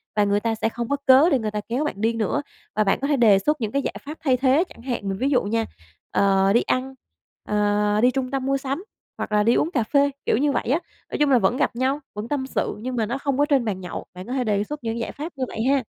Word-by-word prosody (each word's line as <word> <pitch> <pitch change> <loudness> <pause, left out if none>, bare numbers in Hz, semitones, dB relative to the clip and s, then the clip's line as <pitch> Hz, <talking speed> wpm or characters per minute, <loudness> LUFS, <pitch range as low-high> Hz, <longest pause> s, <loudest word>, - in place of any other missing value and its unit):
và 210 - +4
người 205 0 +2
ta 225 +1 -1
sẽ 225 0 0
không 235 0 -5
có 285 - +2
cớ 270 +5 +7
để 275 - +2
người 215 -2 -2
ta 210 0 -3
kéo 255 +6 0
bạn 205 -9 -4
đi 225 +1 +2
nữa 230 +6 -1 0.3
và 215 - +3
bạn 195 - +1
có 280 - -1
thể 290 - +2
đề 215 -5 +6
xuất 300 +6 0
những 215 -1 -1
cái 280 - 0
giải - - -4
pháp 305 +3 -7
thay 260 -4 +3
thế 270 +5 +3
chẳng 230 - -14
hạn. 240 -6 -3
Mình 195 - -2
ví 265 +6 0
dụ 260 -3 +2
nha, 225 +2 0 0.5
ờ, 195 0 +3
đi 235 - +4
ăn, 265 +1 -1 0.6
ờ, 210 0 +2
đi 250 +2 +5
trung 265 0 -2
tâm 270 -1 -2
mua 275 0 +1
sắm 275 +6 -4 0.3
hoặc - - -4
là 210 0 +3
đi 230 - +4
uống 330 - +1
cà 245 -8 +1
phê, 280 +4 +2
kiểu, - - +2
như 290 +2 +2
vậy 255 - -2
á. 310 - +3 0.3
Nói - - -2
chung 295 - +3
là 250 - +6
vẫn 230 +5 +1
gặp 260 - 0
nhau, 265 +4 0
vẫn 210 +2 -5
tâm 265 -1 -2
sự - - -2
nhưng 250 +3 -4
mà 225 - +1
nó 240 +5 -2
không 275 -1 -1
có 290 - +4
trên 275 -5 +2
bàn 190 -4 -2
nhậu, 180 - -6
bạn 185 +2 -9
có 250 - -4
thể 260 -2 0
đề 205 -2 +1
xuất 290 +3 -7
những 230 +1 -2
giải 230 - -3
pháp 315 +4 -7
như 260 - -2
vậy 220 - -4
ha. 275 -3 +2
245 Hz, 295 wpm, -23 LUFS, 210-275 Hz, 0.6 s, cớ